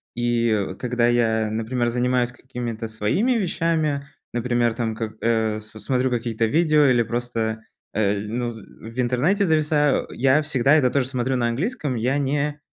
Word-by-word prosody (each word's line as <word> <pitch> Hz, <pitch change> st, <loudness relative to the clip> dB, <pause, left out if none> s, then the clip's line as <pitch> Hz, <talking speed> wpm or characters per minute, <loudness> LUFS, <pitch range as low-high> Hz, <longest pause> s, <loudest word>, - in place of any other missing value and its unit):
И, 115 Hz, -3 st, 0 dB
когда 125 Hz, -1 st, +1 dB
я, 110 Hz, -2 st, +2 dB
например, 120 Hz, +2 st, -1 dB
занимаюсь 125 Hz, 0 st, +1 dB
какими-то 120 Hz, -2 st, -6 dB
своими 110 Hz, -, 0 dB
вещами, 165 Hz, -8 st, 0 dB, 0.3 s
например, 120 Hz, -1 st, +1 dB
там 110 Hz, -1 st, -2 dB
как, 110 Hz, -1 st, -4 dB
э, 110 Hz, -2 st, +1 dB
с 110 Hz, 0 st, -13 dB
смотрю 130 Hz, +2 st, 0 dB
какие-то 115 Hz, -2 st, -1 dB
видео 155 Hz, +4 st, +3 dB
или 125 Hz, -3 st, +4 dB
просто, 115 Hz, -2 st, -3 dB, 0.3 s
э, 100 Hz, -1 st, +1 dB
ну 120 Hz, +3 st, -3 dB
в 115 Hz, +1 st, -11 dB
интернете 135 Hz, -, +2 dB
зависаю, 150 Hz, -3 st, +2 dB
я 135 Hz, +4 st, +3 dB
всегда 140 Hz, -2 st, +2 dB
это 135 Hz, -5 st, +4 dB
тоже 130 Hz, -1 st, 0 dB
смотрю 130 Hz, 0 st, -1 dB
на 120 Hz, -1 st, +1 dB
английском. 145 Hz, -, -2 dB
Я 125 Hz, +5 st, 0 dB
не 145 Hz, +1 st, -1 dB
120 Hz, 150 wpm, -23 LUFS, 115-140 Hz, 0.3 s, или